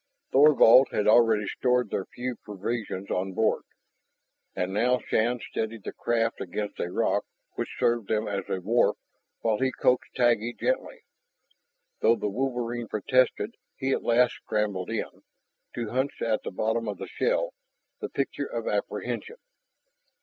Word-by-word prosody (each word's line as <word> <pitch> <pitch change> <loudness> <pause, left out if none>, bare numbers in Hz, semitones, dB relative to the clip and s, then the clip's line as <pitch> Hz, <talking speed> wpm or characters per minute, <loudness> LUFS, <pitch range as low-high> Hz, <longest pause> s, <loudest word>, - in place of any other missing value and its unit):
Thorvald 135 -3 +7
had 105 - 0
already 110 -1 +5
stored 125 +3 +1
their 95 - -1
few 125 0 -5
provisions 105 -1 -4
on 95 +1 -1
board. 110 +4 +1 0.9
And 90 +1 -2
now 125 +5 +3
Shann 120 +1 0
steadied 110 -1 -3
the - - -5
craft 115 -1 0
against 105 +3 -4
a 90 - -2
rock - - +1 0.3
which - - -5
served 115 -3 +1
them 110 +1 0
as 100 -2 -2
a 95 - -2
wharf, 115 +6 +2 0.4
while 110 -2 +1
he 130 0 +1
coaxed 125 0 +1
Taggi 120 -1 +2
gently. - - -1 1.0
Though 115 - +4
the 105 - -2
wolverine 120 -1 -2
protested, 130 +5 +1 0.2
he 135 0 -1
at - - +1
last 120 +1 +3
scrambled 100 -4 -1
in, - - -4 0.5
to 115 -3 -3
hunch 130 +3 -1
at 110 -1 +1
the - - -5
bottom 110 +4 -1
of 105 -2 -3
the - - -6
shell, - - 0 0.5
the - - -4
picture - - -2
of - - -4
apprehension. 465 -1 -3
115 Hz, 150 wpm, -27 LUFS, 105-125 Hz, 1.0 s, Thorvald